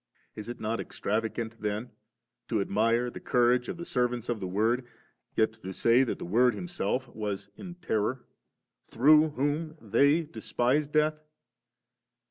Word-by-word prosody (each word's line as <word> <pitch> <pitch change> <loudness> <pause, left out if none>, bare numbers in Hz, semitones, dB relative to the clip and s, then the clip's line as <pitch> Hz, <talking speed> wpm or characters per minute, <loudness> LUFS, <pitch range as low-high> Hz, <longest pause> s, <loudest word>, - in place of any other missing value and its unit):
Is 105 +2 -7
it 120 - -6
not 110 +2 -2
extravagant 110 +1 -3
tlien, 105 +3 -3 0.6
to - - 0
admire 115 +5 +1
the - - -8
courage 125 0 +2
of - - -4
the 170 - -6
servants 125 -4 -1
of 120 -2 -1
the 95 - -4
Word, 115 +6 0 0.5
yet 110 0 +2
to 105 -4 -8
say 115 +6 +4
that 125 - -2
the - - -7
Word 120 +7 +3
Himself 175 -7 -2
was 105 -3 -5
in 180 -3 -9
terror, 125 -7 -2 0.6
through 155 +5 +5
whom 150 +3 -2
they 140 +9 +3
despised 145 -2 -1
death? 155 0 +2
120 Hz, 145 wpm, -29 LUFS, 110-145 Hz, 0.6 s, through